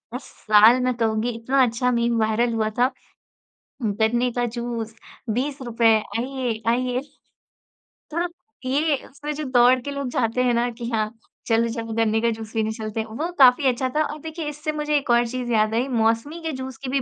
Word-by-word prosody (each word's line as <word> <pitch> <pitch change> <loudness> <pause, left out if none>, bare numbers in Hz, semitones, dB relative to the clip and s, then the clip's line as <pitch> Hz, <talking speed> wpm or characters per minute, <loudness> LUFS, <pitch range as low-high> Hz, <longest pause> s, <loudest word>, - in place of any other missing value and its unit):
इस 255 - -5
साल 215 +4 +4
मैं 255 0 +1
कहूँगी, 225 +1 0
इतना 245 +4 0
अच्छा 250 +1 +1
मीम 235 -1 +1
वायरल 225 +2 +1
हुआ 220 -1 0
था, 250 +1 +4 0.9
"गन्ने 225 +4 +1
का 245 0 -1
जूस 235 -1 -5 0.4
₹20, 240 -2 +1 0.3
आइए, 250 -3 -3
आइए।" 250 +1 +1 1.1
थोड़ा 345 +2 0 0.4
ये 290 +3 +2
उसमें 290 +2 -6
जो 305 - -4
दौड़ 250 +1 +5
के 285 - -5
लोग 280 -2 -3
जाते 240 +1 0
हैं 245 -1 +2
ना 240 +1 +1
कि, 235 0 -6
"हाँ, 215 -1 0 0.4
चलो, 230 +1 +2
चलो, 225 -1 -5
गन्ने 225 0 +1
का 235 - +2
जूस 220 0 -7
पीने 220 -1 0
चलते 220 -1 -5
हैं।" 220 - -3
वो 305 +11 -4
काफ़ी 260 +2 +6
अच्छा 255 +1 -1
था 310 - +3
और 300 0 -5
देखिए, 320 -1 -6
इससे 300 +1 -4
मुझे 300 0 0
एक 275 - -4
और 240 0 +4
चीज़ 250 0 -4
याद 215 0 +2
आई। 250 +4 +1
मौसमी 230 +7 0
के 320 - -2
जूस 260 -2 -7
की 255 - -3
भी 270 0 +1
240 Hz, 190 wpm, -23 LUFS, 225-265 Hz, 1.1 s, काफ़ी